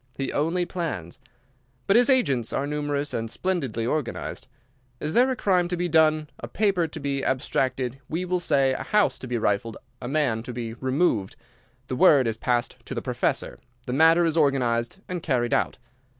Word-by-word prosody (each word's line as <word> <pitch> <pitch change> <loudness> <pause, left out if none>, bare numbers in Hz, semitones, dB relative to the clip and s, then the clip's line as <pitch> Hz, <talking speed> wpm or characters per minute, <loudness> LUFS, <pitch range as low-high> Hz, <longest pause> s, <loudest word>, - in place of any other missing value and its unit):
He 135 - -3
only 165 +4 0
plans. 130 - -5 0.7
But 195 - +3
his 245 +3 +5
agents 140 - +2
are 140 - -1
numerous 145 0 -2
and 115 0 -2
splendidly 135 -8 -2
organized. 145 0 -3 0.5
Is 150 - -3
there 245 +4 +4
a 260 - 0
crime 185 -6 +2
to 180 0 -2
be 175 +1 0
done, 155 -1 +3
a - - -6
paper 195 -5 +1
to - - -8
be 140 -1 -2
abstracted, 130 0 -1
we 170 +3 -2
will 180 0 0
say, 140 -6 +2
a - - -4
house 210 -1 +1
to 130 - -7
be 120 -1 -1
rifled, 110 +1 -1 0.2
a 120 - -5
man 135 -5 0
to 125 +2 -7
be 115 -1 -5
removed—the 130 - -3
word 145 -5 +6
is 115 -1 0
passed 120 0 -1
to - - -6
the - - -2
Professor, - - -2 0.3
the 125 - -3
matter 165 +4 +5
is 165 0 0
organized 125 -4 +1
and 180 -2 -4
carried 125 -6 0
out. - - 0
140 Hz, 180 wpm, -25 LUFS, 125-175 Hz, 0.7 s, word